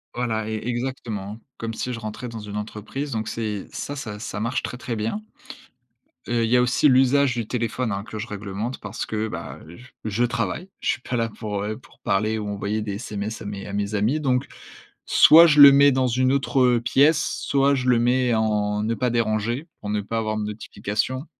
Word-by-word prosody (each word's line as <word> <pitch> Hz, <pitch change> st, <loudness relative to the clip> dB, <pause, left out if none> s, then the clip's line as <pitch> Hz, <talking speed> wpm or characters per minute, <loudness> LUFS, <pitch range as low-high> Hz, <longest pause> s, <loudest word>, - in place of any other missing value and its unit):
Voilà, 110 Hz, -3 st, -1 dB
é 110 Hz, -, -2 dB
exactement, 115 Hz, -4 st, -4 dB, 0.2 s
comme 115 Hz, 0 st, -4 dB
si 125 Hz, +2 st, -3 dB
je 115 Hz, -, -5 dB
rentrais 110 Hz, +2 st, -6 dB
dans 115 Hz, -1 st, -7 dB
une 105 Hz, 0 st, -6 dB
entreprise. 110 Hz, +7 st, -5 dB
Donc 110 Hz, -1 st, -2 dB
c'est 105 Hz, -3 st, -4 dB
ça 145 Hz, -, -5 dB
ça, 110 Hz, -7 st, -6 dB
ça 105 Hz, -2 st, -5 dB
marche 115 Hz, +4 st, -1 dB
très, 125 Hz, -, -5 dB
très 120 Hz, -2 st, -4 dB
bien. 110 Hz, -, -2 dB, 1.1 s
Heu, 120 Hz, -1 st, +1 dB
il -, -, -2 dB
y 125 Hz, -, +4 dB
a 125 Hz, -, +5 dB
aussi 125 Hz, +4 st, +3 dB
l'usage 130 Hz, 0 st, +4 dB
du 115 Hz, -3 st, -3 dB
téléphone, 115 Hz, 0 st, -2 dB
hein, 100 Hz, 0 st, -3 dB
que 110 Hz, 0 st, -8 dB
je 105 Hz, -, -4 dB
réglemente 105 Hz, +4 st, -5 dB
parce 100 Hz, +2 st, -5 dB
que, 110 Hz, 0 st, -2 dB
bah, 85 Hz, -4 st, -7 dB
j 85 Hz, +10 st, -13 dB, 0.2 s
je 110 Hz, +3 st, 0 dB
travaille. 120 Hz, -, -2 dB
Je -, -, -2 dB
suis -, -, 0 dB
pas 125 Hz, -, -4 dB
là 115 Hz, -1 st, 0 dB
pour, 105 Hz, -2 st, -5 dB
heu, 110 Hz, +1 st, -3 dB
pour 130 Hz, -, -20 dB
parler 110 Hz, +3 st, 0 dB
ou 105 Hz, -, -4 dB
envoyer 105 Hz, +2 st, -2 dB
des 105 Hz, -2 st, -4 dB
SMS 105 Hz, 0 st, -5 dB
à -, -, -8 dB
mes 100 Hz, -1 st, -6 dB
à 100 Hz, -, -7 dB
mes 100 Hz, +1 st, -2 dB
amis. 110 Hz, +9 st, +1 dB
Donc 130 Hz, -2 st, 0 dB, 0.6 s
soit 165 Hz, +2 st, +8 dB
je 150 Hz, -2 st, +4 dB
le 140 Hz, -1 st, +12 dB
mets 140 Hz, +1 st, +6 dB
dans 130 Hz, -1 st, +2 dB
une 130 Hz, +2 st, +2 dB
autre 125 Hz, -2 st, +3 dB
pièce, 140 Hz, +6 st, +3 dB, 0.2 s
soit 140 Hz, 0 st, +2 dB
je 130 Hz, -2 st, -1 dB
le 125 Hz, -, +5 dB
mets 125 Hz, 0 st, +2 dB
en, 105 Hz, -1 st, 0 dB
ne 115 Hz, +1 st, 0 dB
pas 125 Hz, +2 st, 0 dB
déranger, 115 Hz, -, -1 dB
pour 105 Hz, -, -5 dB
ne 105 Hz, 0 st, 0 dB
pas 115 Hz, +3 st, -3 dB
avoir 110 Hz, -1 st, -2 dB
de 105 Hz, -, -2 dB
notification. 105 Hz, +4 st, -3 dB
115 Hz, 215 wpm, -23 LUFS, 105-125 Hz, 1.1 s, le